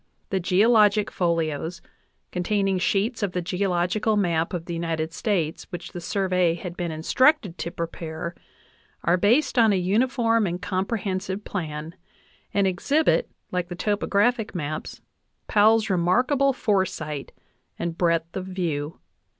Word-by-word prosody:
The 190 - +1
geologic 210 +3 +4
folios, 165 -1 -1 0.5
containing 195 +1 0
sheets 210 +6 0
of 200 -3 -1
the 180 - -1
geological 185 +3 0
map 170 -3 +1
of 175 -3 -4
the 175 - -5
United 165 -1 -2
States 170 -6 -1
which 175 -1 -7
the 175 - -7
Survey 180 -2 +1
had 175 0 -7
been 175 -1 -3
instructed 185 - +2
to - - -2
prepare, 170 0 -5 0.7
are 170 - +4
based 235 +9 +3
on 225 -2 +6
a - - +3
uniform 225 +3 +2
and 175 +1 -3
comprehensive 190 0 -2
plan, 155 -3 -4 0.6
and 200 -1 +2
exhibit, 280 - +2 0.2
like 180 -1 -1
the 175 - -6
topo 205 +3 -1
graphic 220 +1 +1
maps, 155 -2 -4 0.4
Powell's 215 +1 +4
remarkable 250 - +2
foresight 185 - -1 0.5
and 170 -1 -3
breadth 170 -1 0
of 190 0 -4
view. 165 -5 -3
185 Hz, 135 wpm, -25 LUFS, 170-210 Hz, 0.7 s, on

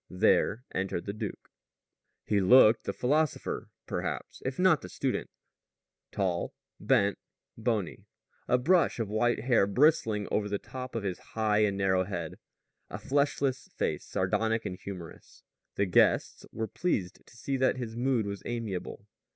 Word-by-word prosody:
There 110 +6 +2
entered 95 -2 -2
the 100 - -3
duke. 105 -2 -6 0.7
He 105 -2 +2
looked 110 +3 +6
the - - -1
philosopher, 150 +3 -1 0.2
perhaps, - - -4
if 130 0 -3
not 180 -4 +4
the 90 - -9
student - - -2 0.8
tall, 90 -3 -1 0.2
bent, 100 -1 +2 0.4
bony; 110 -5 -2 0.4
a 125 - +4
brush 170 +8 +3
of 115 -4 -2
white 120 +3 +1
hair 120 -5 +3
bristling 110 -4 +2
over 105 -1 0
the 100 - 0
top 130 +3 -8
of 115 - -2
his 95 -3 -3 0.2
high 110 -1 +2
and 105 -2 +2
narrow 95 -1 +2
head; 85 -5 -5 0.5
a - - -5
fleshless 140 -1 0
face, - - -1
sardonic 115 0 0
and 90 - -5
humorous. 90 -5 -10 0.3
The 100 - +2
guests 90 - +2
were 110 0 -3
pleased 105 - -2
to 120 - -17
see 135 +4 -2
that 130 0 +2
his 115 -3 -5
mood 120 -2 +1
was 100 -1 -5
amiable. 115 -6 -5
110 Hz, 150 wpm, -29 LUFS, 100-125 Hz, 0.8 s, looked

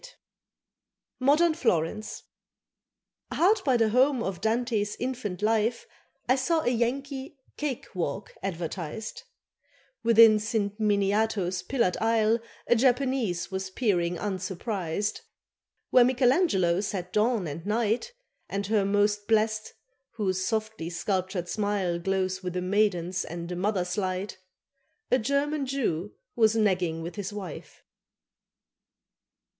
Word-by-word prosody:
XIX - - -13 1.0
MODERN 300 +6 +4
FLORENCE 215 - -1 1.1
HARD 395 +5 +3
by 260 -3 +3
the 225 -2 +3
home 255 +2 +3
of 190 -4 -4
Dante's 220 -2 0
infant 235 -7 -4
life 225 +2 +1 0.4
I 255 - +4
saw 320 +5 +1
a 245 - +1
Yankee 265 +4 -2 0.2
"Kake 290 -5 -3
Walk" 180 +1 -3
advertised; 185 - -5 0.8
Within 225 -2 +7
San 210 -1 -1
Miniato's 200 -3 +1
pillared 235 -10 0
aisle 225 0 +2 0.3
A 240 - +4
Japanese 245 -7 +1
was 190 0 -3
peering 180 -5 0
unsurprised; 190 0 -3 0.7
Where 250 - +7
Michelangelo 245 - +3
set 185 -3 -4
"Dawn" 215 -2 +2
and 155 +1 -6
"Night," 225 - 0 0.4
And 200 0 -2
her, 210 0 +2
most 205 +1 +1
blest, 215 -1 +1 0.4
whose 190 -4 -1
softly 220 -5 -2
sculptured 185 +1 -2
smile 200 -4 -1
Glows 190 +1 -1
with 180 -1 -5
a - - -1
maiden's 185 -2 +1
and 170 +1 -6
a - - -2
mother's 185 0 -1
light, 185 0 -3 0.7
A 255 - +4
German 280 +3 0
Jew 210 - -2 0.2
was 220 -1 +4
nagging 180 -7 +1
with 170 +5 -7
his 205 0 -4
wife. 195 -6 -8
210 Hz, 120 wpm, -27 LUFS, 185-240 Hz, 1.1 s, Within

